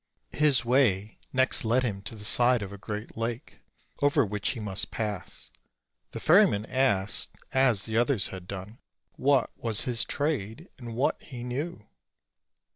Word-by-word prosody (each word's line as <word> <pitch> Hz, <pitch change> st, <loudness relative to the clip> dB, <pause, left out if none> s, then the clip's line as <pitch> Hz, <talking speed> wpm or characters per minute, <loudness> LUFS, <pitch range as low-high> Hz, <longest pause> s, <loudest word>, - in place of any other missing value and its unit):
His 145 Hz, -5 st, +3 dB
way 115 Hz, -5 st, +1 dB
next 130 Hz, 0 st, +1 dB
led 120 Hz, +3 st, +2 dB
him 100 Hz, -5 st, -2 dB
to 115 Hz, -, -7 dB
the 105 Hz, -, -10 dB
side 120 Hz, +1 st, +4 dB
of 100 Hz, 0 st, -8 dB
a -, -, -8 dB
great 105 Hz, +2 st, -6 dB
lake, 115 Hz, +1 st, -5 dB, 0.4 s
over 145 Hz, -1 st, +3 dB
which 105 Hz, 0 st, -1 dB
he 125 Hz, -, -2 dB
must 100 Hz, -1 st, -2 dB
pass. 105 Hz, -, -5 dB, 0.6 s
The -, -, -7 dB
ferryman 175 Hz, -, +4 dB
asked, 105 Hz, -7 st, 0 dB
as 125 Hz, -7 st, +3 dB
the 110 Hz, 0 st, -2 dB
others 120 Hz, -4 st, +1 dB
had 95 Hz, -1 st, -9 dB
done, 100 Hz, +5 st, -8 dB, 0.3 s
what 135 Hz, -3 st, +1 dB
was 115 Hz, -3 st, +4 dB
his 120 Hz, -3 st, +1 dB
trade, 145 Hz, -, -2 dB
and 120 Hz, -2 st, -7 dB
what 130 Hz, +4 st, 0 dB
he 125 Hz, -5 st, -9 dB
knew. 125 Hz, -1 st, -5 dB
115 Hz, 155 wpm, -27 LUFS, 105-130 Hz, 0.6 s, side